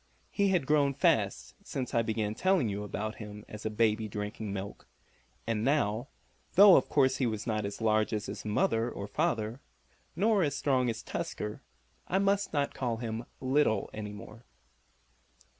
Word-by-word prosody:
He 200 -1 +2
had 180 -7 +2
grown 145 -1 +3
fast - - +1
since 130 -3 -4
I 115 - +3
began 110 -2 -1
telling 185 - +2
you 100 +1 -3
about 105 +2 -4
him 105 -1 -9
as 105 0 -6
a - - -1
baby 110 0 +1
drinking 105 +1 -5
milk, 100 0 -6 0.6
and 115 -1 -1
now, 125 -3 +1 0.5
though 200 0 +9
of 130 - +3
course 130 -2 +3
he 130 - +1
was 110 -2 -3
not 110 -2 -1
as 100 +3 -5
large 110 -1 +2
as 105 -2 -2
his - - -6
mother 115 +2 +1
or 100 - -6
father, 115 -4 -1 0.6
nor 205 +3 +3
as 145 -4 +1
strong 130 -4 +1
as 115 0 -4
Tusker, 105 0 -4 0.5
I 190 - +1
must 200 +1 +1
not 145 -2 0
call 120 -3 -2
him 115 0 -4
"little" 130 -6 +1
any 105 -1 -5
more. 110 +3 -11
115 Hz, 170 wpm, -30 LUFS, 105-140 Hz, 0.6 s, though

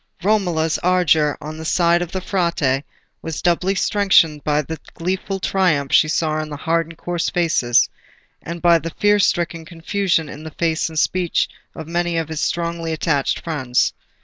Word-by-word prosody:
Romola's 175 -6 +1
ardour 165 -5 +2
on 155 +1 -7
the - - -6
side 170 +1 +2
of 175 -1 -4
the 190 - -3
Frate 170 -8 0 0.4
was 160 -2 -5
doubly 180 +2 +1
strengthened 185 -7 +3
by 150 0 +1
the 160 +3 -6 0.2
gleeful 190 +3 -3
triumph 170 -8 +1
she 155 - +6
saw 155 0 0
in 155 - -6
hard 165 +3 -1
and 165 -1 -12
coarse 175 -1 -2
faces, 155 -9 +2 0.5
and 170 +1 -7
by 170 -1 +6
the 165 - -5
fear 205 +5 +2
stricken 170 -4 0
confusion 170 0 -1
in 150 +1 -9
the 160 - -6
faces 160 +1 -1
and 160 - -8
speech 180 +2 +1 0.3
of 160 - -8
many 175 0 -1
among 165 -1 -2
his 160 -1 -3
strongly 170 -1 -2
attached 150 -3 0
friends. 130 -7 0
165 Hz, 170 wpm, -20 LUFS, 155-175 Hz, 0.5 s, she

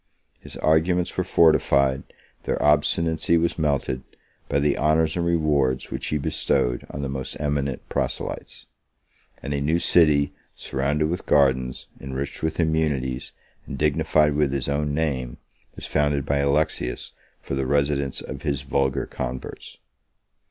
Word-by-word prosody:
His - - -10
arguments 85 +3 +2
were 90 - 0
fortified, 70 -6 +3 0.4
their - - -1
obstinacy 80 +3 +2
was 85 +1 0
melted, 70 -4 0 0.5
by 70 - +1
the 70 0 +2
honors 80 +1 +2
and 85 - 0
rewards 75 -6 +1
which - - -4
he 75 - 0
bestowed - - 0
on 70 - -5
the - - -1
most 65 -1 -5
eminent 70 -2 -2
proselytes; - - -4 0.8
and 70 - -3
a 70 - -1
new 80 +4 +2
city, 75 -5 +3 0.2
surrounded 70 +3 -1
with 90 +4 -4
gardens, 65 -3 +2
enriched 70 +1 -5
with 80 +1 -2
immunities, 75 -6 0 0.4
and 70 - -5
dignified 75 0 +2
with 75 -2 +1
his 70 -1 -2
own 70 0 -1
name, 65 -6 -2 0.4
was - - -8
founded 75 -2 0
by 70 0 +1
Alexius 70 -2 0 0.3
for - - -7
the 70 -1 -1
residence 70 -1 0
of 70 - -7
his 70 -3 -2
vulgar 70 0 0
converts. 65 0 -6
70 Hz, 140 wpm, -24 LUFS, 70-80 Hz, 0.8 s, fortified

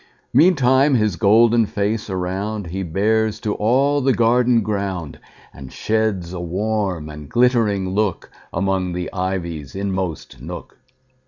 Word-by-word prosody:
Meantime 135 -2 +4
his 105 -5 +1
golden 115 +3 +4
face 105 +2 -2
aroundHe 95 -1 -3
bears 110 +3 +1
to 105 - -2
all 135 +6 +2
the 135 0 +2
garden 120 0 +3
ground, 100 -6 -3 0.3
And 65 -2 -11
sheds 105 -5 -1
a 90 - -5
warm 95 -1 -2
and 75 -1 -10
glittering 110 -5 +2
lookAmong 95 -2 -2
the 90 0 -4
ivy's 85 -6 -4
inmost 95 -9 -4
nook. 85 0 -9
100 Hz, 115 wpm, -20 LUFS, 90-115 Hz, 0.3 s, Meantime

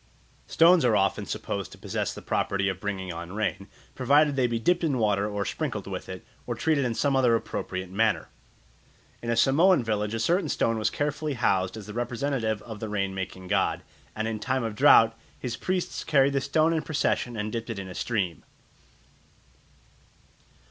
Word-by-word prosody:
Stones 170 -1 +5
are 120 -3 +3
often 100 -1 +1
supposed - - -4
to - - -12
possess - - -3
the - - -9
property 100 0 0
of 95 -2 -2
bringing 95 -3 -4
on 85 +2 -7
rain, 100 -2 -2 0.3
provided 145 +3 +3
they 130 -2 +2
be 120 -1 -1
dipped 175 +10 +1
in 145 -5 +1
water 105 -2 +1
or 105 -1 -2
sprinkled - - -3
with - - -6
it, - - -8 0.2
or - - -2
treated 155 -4 +1
in 120 -2 -1
some 140 +2 +1
other 125 -3 +4
appropriate 95 -4 -4
manner. 110 +1 +1 0.9
In 115 - -5
a 115 - +2
Samoan 150 +6 +4
village 105 -1 -1
a - - -2
certain 175 - +1
stone 115 -1 +1
was 110 - +1
carefully 145 0 -2
housed 95 -3 +1
as 105 - -8
the 105 - -8
representative 120 -2 -2
of 110 -3 -8
the 110 - -5
rain 100 -2 -1
making 95 -1 -6
god, - - 0 0.3
and 110 +1 -2
in 110 -1 -3
time 130 +3 -1
of 115 -2 -3
drought 115 +1 +6 0.2
his 120 -3 -4
priests 185 +5 -2
carried 140 -2 +3
the 140 - +1
stone 155 +4 +2
in 160 - 0
procession 135 -5 -1
and 105 0 -3
dipped 115 +1 -4
it 115 - -4
in 95 -1 -5
a 90 - -8
stream. 95 -7 -2
115 Hz, 190 wpm, -27 LUFS, 105-135 Hz, 0.9 s, drought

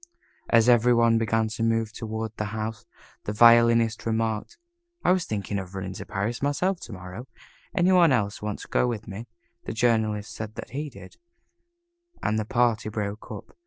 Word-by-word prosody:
As 115 0 +5
every 120 0 +5
one 115 -1 +4
began 115 0 +1
to 110 +1 -6
move 115 -1 +1
toward 110 -1 -5
the 105 - -2
house, 110 0 -5 0.4
the - - -2
Violinist 115 0 +5
remarked, 110 - -1 0.5
"I - - +5
was 185 -2 +2
thinking 100 -1 -3
of 95 0 -8
running 95 -1 -4
up 95 - -8
to - - -7
Paris 105 +5 -2
myself 165 +7 0
to 115 - -9
morrow. 90 +7 -8 0.5
Any 180 +1 +4
one 175 -4 +6
else 105 -5 0
want 105 -1 -3
to - - -10
go - - +1
with 115 -3 -4
me?" 110 +3 -7 0.4
The - - -4
Journalist 110 -2 +1
said 110 0 -7
that - - -8
he 145 +3 -4
did, - - -13 1.1
and 110 +1 +1
the 110 - -2
party 120 -2 +1
broke 105 0 -4
up. - - -9
115 Hz, 185 wpm, -26 LUFS, 105-120 Hz, 1.1 s, one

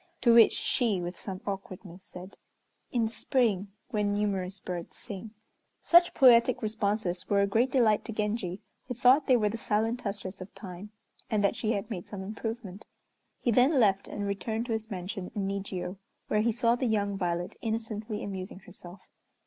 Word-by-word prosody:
To 235 - +5
which 230 -1 +7
she, 225 -7 0
with 175 +1 -4
some 190 +1 -7
awkwardness, 190 -2 -7
said, 185 +1 -10 0.6
"In 235 -2 +1
the 220 - -3
spring, 225 -6 +1 0.2
when 210 -3 +1
numerous 195 -2 -1
birds 175 -2 -6
sing." 215 -1 -8 0.5
Such 345 0 +6
poetic 245 -1 +6
responses 205 -4 -1
were 200 -1 +4
a - - +4
great 225 +6 +2
delight 235 -5 +3
to - - -4
Genji, 210 -3 -2 0.3
who 250 - -4
thought 260 +4 +5
they 255 - +6
were 215 -2 +2
the 225 - -4
silent 225 +3 0
touches 200 -3 -5
of 185 - -10
time, 190 0 -8 0.4
and 210 -2 +1
that 200 - +2
she 225 0 0
had 200 +2 -4
made 180 -5 -5
some 195 -2 -6
improvement. 215 -1 -6 0.5
He 240 - +2
then 255 +5 +4
left 200 -4 +3
and 205 - -4
returned 220 +3 -2
to 240 - -5
his 220 0 -3
mansion 185 -1 -5
in 200 -2 -1
Nijiô, 195 -2 -4 0.3
where 210 - +2
he 230 +2 +2
saw 235 +1 +2
the 250 +1 -1
young 205 -2 0
Violet 175 -2 -2
innocently 220 -1 -3
amusing 190 -1 -6
herself. 180 0 -11
210 Hz, 180 wpm, -29 LUFS, 190-230 Hz, 0.6 s, which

